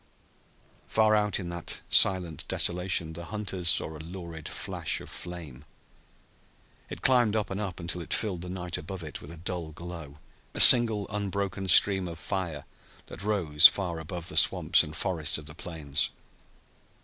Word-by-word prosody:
Far 110 -1 +1
out 105 -1 -1
in 90 -3 -7
that 85 0 -4
silent 90 -4 +3
desolation 90 -2 0
the 85 +1 -9
hunters 95 -4 -2
saw 80 - +1
a - - -11
lurid 85 -1 -10
flash - - -4
of - - -13
flame. 80 -7 -10 1.3
It - - -10
climbed 120 -5 +3
up 105 -3 -3
and 95 +2 -5
up, 95 -5 -6
until 85 +1 -5
it - - -12
filled 95 -6 -2
the 90 - -9
night 90 -1 -5
above 95 -3 -9
it 75 -2 -9
with 75 - -13
a 85 - -11
dull 85 0 -6
glow 80 -2 -11 0.4
a - - -1
single 115 -5 +9
unbroken 100 -1 -5
stream 95 +1 +4
of 85 -1 -9
fire 85 -5 -6 0.4
that - - -12
rose 95 -8 +4
far 90 -4 -5
above 85 +1 -7
the - - -3
swamps - - +5
and 75 - -10
forests 80 -2 -1
of 75 - -12
the 75 - -10
plains. 75 -4 -3
90 Hz, 165 wpm, -26 LUFS, 80-100 Hz, 1.3 s, single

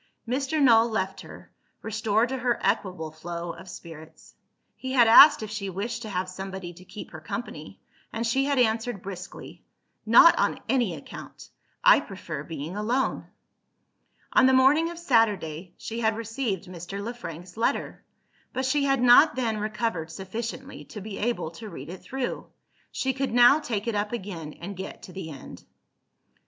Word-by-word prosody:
Mr. 275 +5 -1
Null 235 -4 +6
left 190 -3 -2
her, - - -13 0.3
restored 220 +1 +1
to 265 - -2
her 245 -1 0
equable 185 -6 -1
flow 170 +2 -6
of 185 +2 -12
spirits. 160 -3 -12 0.4
He 260 0 -5
had 240 -3 +6
asked 280 +3 +9
if 215 - -6
she 205 -2 -4
wished 225 +5 -4
to 220 - -6
have 185 -1 -2
somebody 190 -1 -7
to 180 +2 -15
keep 205 +3 -10
her - - -8
company - - -7 0.3
and 230 +1 -3
she 270 +4 +1
had 280 -1 0
answered 225 -3 +1
briskly, 185 -1 -9 0.4
"Not 285 +10 +7
on - - +1
any 240 -10 +1
account! 145 - -11 0.3
I - - +8
prefer - - -7
being 160 +3 -6
alone." 235 +6 -1 1.1
On 260 - +6
the 260 - +4
morning 295 +6 +4
of 340 - -8
Saturday, 200 - 0
she 230 +1 -6
had 220 -1 +1
received 225 -4 -3
Mr. 180 +2 -7
Le 225 +4 -4
Frank's 175 -6 -9
letter; 225 - -1 0.5
but 260 +1 -1
she 280 +2 +1
had 270 -2 +2
not 270 +6 +7
then 230 -4 -1
recovered 210 -6 -2
sufficiently 225 +9 -6
to 215 - -9
be 200 0 -7
able 230 -7 -1
to 215 +6 -9
read 140 -5 -9
it 180 +1 -8
through. 265 -1 -4 0.4
She 265 0 -1
could 270 +1 -2
now 245 +5 +7
take 225 -8 -3
it 230 - -1
up 210 +2 -2
again, 180 -9 -6
and 195 +4 -8
get 190 - -8
to 180 - -11
the 190 -4 -6
end. 140 -4 -10
220 Hz, 170 wpm, -26 LUFS, 185-245 Hz, 1.1 s, asked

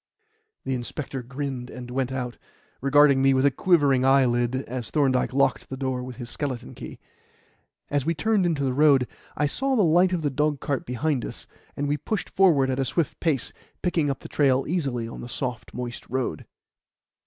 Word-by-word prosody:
The 135 - -2
inspector 130 +2 -4
grinned 130 0 -5
and 125 -1 -8
went 130 0 -1
out, 125 -2 -4 0.4
regarding 140 0 +5
me 135 0 +4
with 130 +1 +3
a 140 - +5
quivering 140 -4 +3
eyelid 130 -2 +3
as 120 -2 -5
Thorndyke 135 -5 +2
locked 130 -4 +1
the 130 - -5
door 130 -1 -2
with 125 0 -7
his 120 -2 -7
skeleton 125 - -4
key. - - -9 0.9
As 145 -2 +1
we 165 +4 0
turned 210 +5 +2
into 160 -5 0
the 130 -2 0
road, 140 -3 +4 0.3
I 150 - +2
saw 265 - 0
the 215 - +4
light 175 +2 +4
of 175 -3 -1
the 145 - 0
dogcart 145 -1 -1
behind 130 +2 -1
us, - - -6 0.3
and 145 - -1
we 145 +1 +1
pushed 190 +5 -3
forward 150 -9 +4
at 130 - -2
a 135 - +1
swift 140 +4 -1
pace, 150 -8 0 0.3
picking 165 -5 +1
up 140 - -3
the - - -8
trail 135 -2 +2
easily 135 -9 -1
on 115 - -8
the 120 - -8
soft, 125 -3 -4
moist 120 -1 -6
road. 125 - -3
135 Hz, 190 wpm, -25 LUFS, 125-150 Hz, 0.9 s, regarding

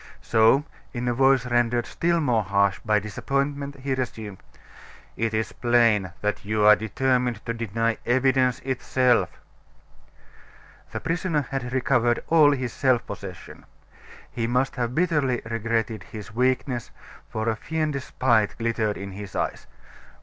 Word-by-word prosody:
So, 115 +6 +4 0.3
in 125 -1 -3
a 120 - +2
voice 135 0 +3
rendered 120 -1 +1
still 170 0 0
more 125 -8 +2
harsh 100 -1 +1
by 110 -2 +2
disappointment, 140 +6 -3
he 135 0 -1
resumed: 110 -6 -4 0.8
"It 115 0 -1
is 110 0 -1
plain 115 -6 +2
that 105 0 -2
you 105 +1 +1
are 105 0 +9
determined 125 +1 -1
to 115 - -2
deny 115 0 -1
evidence 130 0 +2
itself." 130 -1 +1 1.6
The - - -4
prisoner 165 -2 -1
had 130 -2 -3
recovered 120 -2 +1
all 160 -3 +6
his 130 -4 -2
self 130 -3 +2
possession. 95 -3 -9 0.7
He 115 -1 -2
must 125 +2 0
have 120 -1 -2
bitterly 150 -8 +1
regretted 115 -1 -2
his 105 +1 -10
weakness, 125 0 0 0.4
for 110 +1 -3
a 115 - +1
fiendish 150 0 -2
spite 115 -7 +1
glittered 115 -2 -1
in 100 0 -6
his 100 0 -9
eyes. - - -3
120 Hz, 135 wpm, -25 LUFS, 110-130 Hz, 1.6 s, are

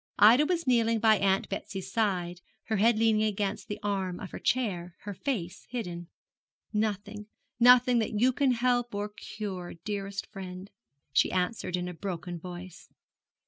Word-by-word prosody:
Ida 240 +8 +7
was 340 -2 0
kneeling 230 -3 +3
by 220 -2 +4
Aunt 195 0 +2
Betsy's 195 -1 -5
side, 180 -5 0 0.2
her 220 - -1
head 225 +3 +4
leaning 220 -1 +3
against 210 -1 -1
the 205 - -4
arm 190 -3 -1
of 190 - -7
her - - -6
chair, 180 -9 -1
her 205 - -6
face 190 -6 -4
hidden. 175 -8 -5 0.7
'Nothing, 210 0 -2 0.3
nothing 245 0 +7
that 215 -1 -1
you 255 +3 +4
can 270 -1 +2
help 245 -1 +1
or 205 +1 -2
cure, 200 -3 -6
dearest 200 -1 -3
friend,' 185 0 -8 0.4
she - - +4
answered 180 0 -1
in 180 0 -3
a 180 - -5
broken 175 -1 -5
voice. 180 0 -9
205 Hz, 155 wpm, -29 LUFS, 185-230 Hz, 0.7 s, Ida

